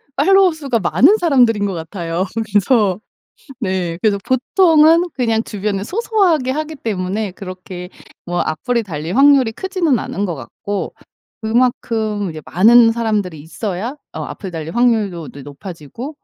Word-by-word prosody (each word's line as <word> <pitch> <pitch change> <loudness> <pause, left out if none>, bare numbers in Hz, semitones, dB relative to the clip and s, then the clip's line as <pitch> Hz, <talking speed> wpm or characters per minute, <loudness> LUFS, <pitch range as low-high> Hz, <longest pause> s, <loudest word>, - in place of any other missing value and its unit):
팔로워 385 -2 +5
수가 275 -7 -2
많은 195 - +4
사람들인 245 - +3
것 195 - -2
같아요. 170 +1 -3 0.3
그래서 205 -2 +2 0.6
네. 185 -4 -2
그래서 205 -1 +2
보통은 325 +5 +4
그냥 225 -3 0
주변에 200 -2 -3
소소하게 360 - +1
하기 310 +1 -4
때문에 200 -3 -3
그렇게 185 -1 -8 0.4
뭐 175 0 -2
악플이 230 +9 -1
달릴 165 +1 -5
확률이 275 -3 +5
크지는 345 - 0
않은 200 - -3
것 170 -5 -3
같고 195 +11 -5 0.5
그만큼 220 -3 0
이제 155 -1 -8
많은 225 +5 +6
사람들이 210 -9 -2
있어야 205 - -5 0.2
어 - - -5
악플이 190 -3 -7
달릴 165 +5 -6
확률도 210 -9 +1
네 140 - -11
높아지고 170 - -9
215 Hz, 320 characters per minute, -18 LUFS, 180-260 Hz, 0.6 s, 많은